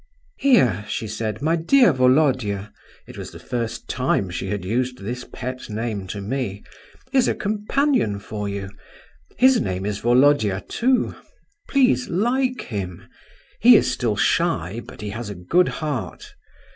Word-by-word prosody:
"Here," 125 Hz, -, +4 dB
she 110 Hz, -, -3 dB
said, 110 Hz, +3 st, -4 dB
"my 160 Hz, +2 st, +2 dB
dear 190 Hz, -, +4 dB
Volodya,"—it 130 Hz, -6 st, 0 dB
was -, -, -6 dB
the -, -, -11 dB
first 120 Hz, -1 st, -4 dB
time 115 Hz, -7 st, 0 dB
she 95 Hz, +2 st, -4 dB
had 100 Hz, -1 st, -3 dB
used 125 Hz, +5 st, -1 dB
this 120 Hz, +5 st, -6 dB
pet 130 Hz, 0 st, -6 dB
name 105 Hz, -3 st, -3 dB
to 100 Hz, +2 st, -5 dB
me—"is 130 Hz, -, -3 dB
a -, -, +1 dB
companion 215 Hz, -, 0 dB
for 105 Hz, 0 st, -5 dB
you. 100 Hz, -1 st, -5 dB, 0.7 s
His 260 Hz, 0 st, +5 dB
name 95 Hz, -3 st, -3 dB
is 105 Hz, -1 st, -2 dB
Volodya, 120 Hz, -5 st, +3 dB
too. 255 Hz, +2 st, +1 dB, 0.6 s
Please, 250 Hz, -, +3 dB
like 250 Hz, +7 st, 0 dB
him; 95 Hz, -6 st, -6 dB, 0.5 s
he -, -, +8 dB
is -, -, +3 dB
still -, -, -1 dB
shy, 95 Hz, +9 st, 0 dB
but -, -, -11 dB
he 105 Hz, -, -4 dB
has 110 Hz, 0 st, -6 dB
a 100 Hz, -, -6 dB
good 170 Hz, -, +2 dB
heart. 150 Hz, -6 st, -4 dB
120 Hz, 145 wpm, -22 LUFS, 100-165 Hz, 0.7 s, he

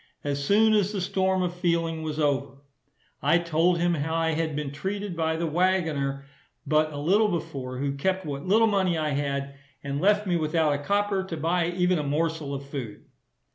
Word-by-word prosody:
As 140 Hz, -1 st, -2 dB
soon 215 Hz, +7 st, +4 dB
as 205 Hz, -2 st, +2 dB
the 205 Hz, -, -3 dB
storm 190 Hz, 0 st, +1 dB
of 175 Hz, -1 st, -2 dB
feeling 170 Hz, -2 st, 0 dB
was 155 Hz, -1 st, -4 dB
over, 140 Hz, -2 st, 0 dB, 0.7 s
I 150 Hz, +4 st, +4 dB
told 170 Hz, +1 st, +2 dB
him 175 Hz, +1 st, +2 dB
how 160 Hz, +1 st, -2 dB
I 165 Hz, 0 st, +1 dB
had 160 Hz, -1 st, -1 dB
been 150 Hz, -2 st, -3 dB
treated 195 Hz, +5 st, -4 dB
by 160 Hz, -1 st, 0 dB
the 165 Hz, +1 st, -2 dB
waggoner 155 Hz, -5 st, 0 dB, 0.4 s
but 155 Hz, 0 st, +2 dB
a 145 Hz, -, -6 dB
little 195 Hz, +9 st, +3 dB
before, 150 Hz, -8 st, -4 dB
who 140 Hz, +1 st, -1 dB
kept 185 Hz, +7 st, -1 dB
what 140 Hz, +2 st, -5 dB
little 220 Hz, +4 st, +5 dB
money 190 Hz, -5 st, +1 dB
I 155 Hz, -1 st, 0 dB
had, 140 Hz, -1 st, -2 dB, 0.3 s
and 140 Hz, 0 st, -3 dB
left 210 Hz, +2 st, +3 dB
me 180 Hz, -3 st, +1 dB
without 155 Hz, -1 st, +1 dB
a 145 Hz, -, -2 dB
copper 200 Hz, +4 st, 0 dB
to 170 Hz, -3 st, -5 dB
buy 165 Hz, +2 st, +1 dB
even 180 Hz, 0 st, +1 dB
a -, -, -2 dB
morsel 155 Hz, 0 st, -1 dB
of 140 Hz, 0 st, -5 dB
food. 130 Hz, -7 st, -7 dB
165 Hz, 195 wpm, -26 LUFS, 145-185 Hz, 0.7 s, little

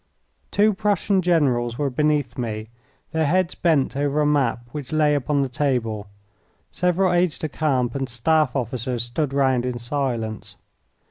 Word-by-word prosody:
Two 210 Hz, +1 st, +3 dB
Prussian 200 Hz, -1 st, +1 dB
generals 130 Hz, -9 st, +1 dB
were 140 Hz, -1 st, -1 dB
beneath 145 Hz, -2 st, +1 dB
me, 110 Hz, -3 st, -4 dB, 0.4 s
their 160 Hz, -2 st, +1 dB
heads 185 Hz, +2 st, +1 dB
bent 155 Hz, -7 st, +1 dB
over 145 Hz, +1 st, 0 dB
a 150 Hz, -, +3 dB
map 135 Hz, -5 st, +1 dB
which 145 Hz, -2 st, -7 dB
lay 155 Hz, -1 st, +3 dB
upon 145 Hz, 0 st, +1 dB
the -, -, -1 dB
table. 120 Hz, -6 st, -1 dB, 0.6 s
Several 180 Hz, +1 st, +1 dB
aides 175 Hz, -2 st, +2 dB
de 155 Hz, -, -3 dB
camp 135 Hz, -5 st, 0 dB
and 135 Hz, -1 st, -3 dB
staff 145 Hz, +4 st, +1 dB
officers 125 Hz, -1 st, -2 dB
stood 130 Hz, +4 st, -2 dB
round 130 Hz, -3 st, +2 dB
in 125 Hz, -1 st, -2 dB
silence. 120 Hz, -4 st, -3 dB
140 Hz, 150 wpm, -23 LUFS, 120-155 Hz, 0.6 s, Two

